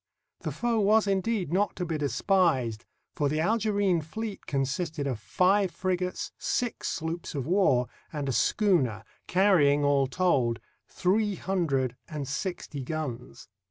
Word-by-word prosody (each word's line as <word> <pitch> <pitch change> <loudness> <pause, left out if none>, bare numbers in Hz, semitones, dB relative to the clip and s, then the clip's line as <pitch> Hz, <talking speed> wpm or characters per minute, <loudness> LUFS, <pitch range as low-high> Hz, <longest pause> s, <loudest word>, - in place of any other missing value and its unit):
The - - -4
foe 235 -2 0
was 215 +1 +4
indeed 195 -3 0
not 200 +2 +1
to 180 - -3
be 165 -1 -2
despised, 145 - +1 0.3
for 145 -1 0
the 155 +2 -1
Algerine 200 -2 +2
fleet 205 +7 -6
consisted 145 +3 -2
of 130 -5 -2
five 190 - +2
frigates, 180 0 -2
six 245 -2 -2
sloops 165 0 -4
of 135 -3 -2
war, 165 -8 +3 0.3
and 145 -3 -3
a - - +1
schooner, 130 - +2 0.2
carr3dng, 165 -7 +4
all 140 -1 +3
told, 130 -7 +1 0.3
three 205 +2 +1
hundred 140 -11 -1
and 150 -3 -4
sixty 145 0 -4
guns. 130 -4 -5
170 Hz, 135 wpm, -28 LUFS, 140-195 Hz, 0.3 s, was